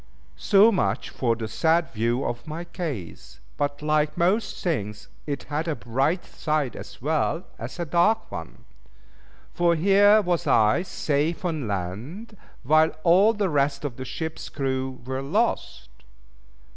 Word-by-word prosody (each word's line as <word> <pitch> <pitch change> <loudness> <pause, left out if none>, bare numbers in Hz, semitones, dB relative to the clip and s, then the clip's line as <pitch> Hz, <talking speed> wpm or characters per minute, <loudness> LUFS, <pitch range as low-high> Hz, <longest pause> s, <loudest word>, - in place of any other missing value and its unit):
So 200 - +5
much 190 - -1
for 120 -3 0
the 115 -1 -5
sad 160 +9 +1
view 120 +4 0
of 120 +6 -4
my 160 +3 -5
case; 115 - -7 0.2
but 145 0 -2
like 150 0 +1
most 195 +5 0
things 105 - -3 0.2
it 140 -1 -3
had 155 +3 -3
a 160 - 0
bright 135 +10 -1
side 150 -4 -2
as - - -10
well 160 +3 0
as - - -7
a 170 - -2
dark 175 +8 +2
one. - - -8 0.9
For 170 -1 +2
here 200 +5 +5
was 175 -2 -1
I 110 +9 +4
safe 160 -1 -1
on 155 -8 -2
land, 110 - -5 0.3
while 155 +4 +4
all 190 +6 +5
the 205 -3 0
rest 140 -1 0
of 130 -5 -4
the 130 - -6
ship's 160 +5 -5
crew 130 -2 -3
were 130 +1 -3
lost. 135 - -1
150 Hz, 145 wpm, -25 LUFS, 130-175 Hz, 0.9 s, So